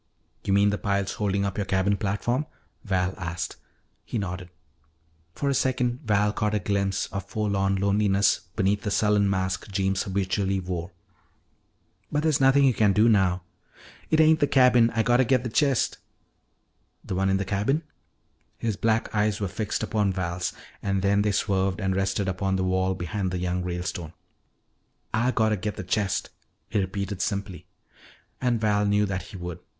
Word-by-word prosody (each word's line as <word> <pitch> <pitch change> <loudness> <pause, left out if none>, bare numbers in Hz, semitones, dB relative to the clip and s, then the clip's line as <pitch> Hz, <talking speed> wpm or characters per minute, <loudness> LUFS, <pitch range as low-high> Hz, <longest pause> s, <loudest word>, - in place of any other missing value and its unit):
"You - - -2
mean 100 +1 +4
the 105 - -2
piles 100 -1 0
holding 100 -1 +1
up 100 +1 -3
your 100 - -1
cabin 95 +1 +1
platform?" 115 +8 -1 0.4
Val 95 -3 0
asked. 85 -1 -4 0.5
He - - -4
nodded. 90 -3 -4 0.9
For 140 - -2
a 140 - +2
second 125 -2 0
Val 105 -1 +2
caught 105 0 0
a - - +2
glimpse 100 0 0
of 100 0 -5
forlorn 100 -2 0
loneliness 100 0 +2 0.2
beneath 100 +2 +1
the 110 - -3
sullen 105 0 +2
mask 95 0 -1
Jeems 95 -1 0
habitually 95 0 -1
wore. 90 -2 -4 1.2
"But 150 0 0
there's 155 -4 +2
nothing 135 +1 +5
you 135 -2 +5
can 105 -3 +3
do 105 +4 +4
now 95 -5 +3 0.3
" - - -22
"It 155 - +3
ain't 160 0 +5
the 145 - +3
cabin. 125 -4 +5
Ah 115 - +2
gotta 120 +3 +4
git 125 0 +2
the 125 - -3
chest 135 0 +1 0.5
" - - -46
"The - - -4
one 95 +1 +1
in 95 - +3
the 100 - -2
cabin?" 105 - 0 0.7
His 110 -3 -2
black 115 0 0
eyes 105 -1 +1
were 100 - -1
fixed 105 +3 -3
upon 105 -3 0
Val's, 90 -1 -2 0.3
and 95 -1 -1
then 100 +1 +3
they 105 0 +1
swerved 95 0 0
and 95 -2 0
rested 95 +1 0
upon 95 +1 -1
the 95 - 0
wall 95 0 +1
behind 95 +2 -3
the 90 - -3
young 90 0 -1
Ralestone. 90 -2 -4 1.0
"Ah 115 +3 +2
gotta 110 -3 +2
git 105 +2 -3
the - - -5
chest," 95 -2 -1 0.4
he - - +1
repeated 100 0 -3
simply. 100 -1 -3 0.7
And 125 -2 +1
Val 105 -1 +2
knew 105 +1 +3
that 95 -2 -4
he 95 - -8
would. 90 -1 -6
100 Hz, 175 wpm, -26 LUFS, 95-110 Hz, 1.2 s, nothing